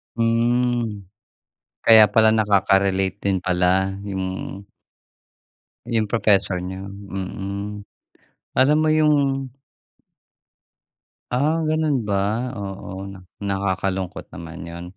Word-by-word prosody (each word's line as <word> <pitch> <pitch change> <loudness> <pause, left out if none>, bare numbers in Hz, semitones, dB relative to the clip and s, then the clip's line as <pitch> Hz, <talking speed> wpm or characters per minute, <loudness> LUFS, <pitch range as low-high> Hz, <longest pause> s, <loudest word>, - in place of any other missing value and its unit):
Hmm. 115 -2 +1 0.8
Kaya 110 -1 +8
pala 110 0 +4
nakaka-relate 95 -2 +2
din 95 -1 +2
pala 90 +1 +2 0.2
yung 95 0 -4 1.2
yung 115 -3 0
professor 100 -4 +2
niyo, 95 +2 -6
mm. 100 +1 -6 0.7
Alam 145 +4 +5
mo 155 - +2
yung 155 -1 +4 2.2
Ah, 145 +6 +2
ganun 155 -6 0
ba? 105 +5 -1
Oo, 95 -2 -6 0.3
nakakalungkot 95 -2 -2
naman 85 0 -9
yun. 85 0 -8
100 Hz, 85 wpm, -22 LUFS, 95-115 Hz, 2.2 s, Kaya